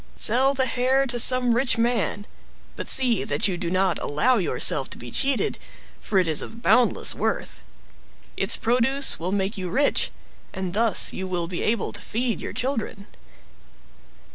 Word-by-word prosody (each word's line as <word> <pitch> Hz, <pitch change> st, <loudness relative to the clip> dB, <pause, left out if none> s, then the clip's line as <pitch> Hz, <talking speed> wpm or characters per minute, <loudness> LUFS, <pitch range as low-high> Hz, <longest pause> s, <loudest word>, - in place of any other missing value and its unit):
Sell 265 Hz, +5 st, +2 dB
the 260 Hz, -1 st, 0 dB
hair 260 Hz, +2 st, 0 dB
to 245 Hz, -2 st, -3 dB
some 250 Hz, 0 st, +4 dB
rich 240 Hz, 0 st, +1 dB
man; 230 Hz, -3 st, -1 dB, 0.5 s
but -, -, -6 dB
see 250 Hz, -5 st, +5 dB
that 145 Hz, +6 st, -1 dB
you 190 Hz, -, -2 dB
do 175 Hz, -1 st, -4 dB
not 185 Hz, 0 st, 0 dB
allow 240 Hz, -, 0 dB
yourself 135 Hz, -5 st, +2 dB
to -, -, -7 dB
be 120 Hz, 0 st, -10 dB
cheated, 270 Hz, -, -1 dB, 0.4 s
for 200 Hz, -, -3 dB
it 185 Hz, -2 st, +2 dB
is 155 Hz, -2 st, +2 dB
of 230 Hz, +1 st, -10 dB
boundless 250 Hz, -1 st, +2 dB
worth. -, -, -4 dB, 0.7 s
Its -, -, +1 dB
produce 255 Hz, +4 st, +2 dB
will 175 Hz, +3 st, -4 dB
make 195 Hz, +1 st, -2 dB
you 185 Hz, -1 st, -5 dB
rich 280 Hz, +10 st, 0 dB, 0.5 s
and 185 Hz, -2 st, -4 dB
thus 225 Hz, 0 st, +3 dB
you 190 Hz, -, -5 dB
will 175 Hz, -2 st, -3 dB
be 175 Hz, 0 st, -5 dB
able 220 Hz, -2 st, -1 dB
to -, -, -7 dB
feed 235 Hz, +1 st, -3 dB
your -, -, -6 dB
children." 230 Hz, -6 st, -4 dB
225 Hz, 165 wpm, -23 LUFS, 185-255 Hz, 0.7 s, see